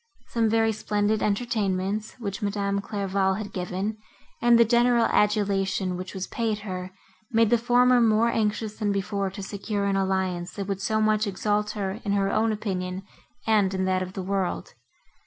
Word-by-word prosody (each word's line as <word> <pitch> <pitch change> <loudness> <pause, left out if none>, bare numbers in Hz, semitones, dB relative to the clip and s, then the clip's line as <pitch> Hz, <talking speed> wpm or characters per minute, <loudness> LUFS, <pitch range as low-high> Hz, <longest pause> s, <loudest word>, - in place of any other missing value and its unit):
Some 230 -2 +1
very 225 0 +3
splendid 210 0 0
entertainments, 205 -2 -1
which 200 -5 -5
Madame 200 -1 -1
Clairval 195 -2 0
had 210 -1 -6
given, 190 +4 -3 0.4
and 240 0 +6
the 235 - +6
general 240 0 +4
adulation, 195 -3 +1
which 185 +2 -7
was 190 0 -3
paid 220 -3 -2
her, 185 -2 -5 0.4
made 225 -1 +3
the 240 - +6
former 245 +1 +4
more 225 0 +4
anxious 215 -1 -1
than 210 -2 +1
before 200 0 -1
to 195 +1 -8
secure 200 +1 -3
an 200 -1 +1
alliance, 190 -2 -1
that 200 - -4
would 195 -1 -3
so 220 +2 0
much 215 0 +2
exalt 210 +2 0
her 195 +1 -3
in 200 - 0
her 195 -1 +1
own 220 +1 +2
opinion 190 -3 -3 0.4
and 205 -4 +2
in 190 0 0
that 185 0 +1
of 185 0 -5
the 190 - -4
world. 190 -1 -2
205 Hz, 175 wpm, -26 LUFS, 190-220 Hz, 0.4 s, and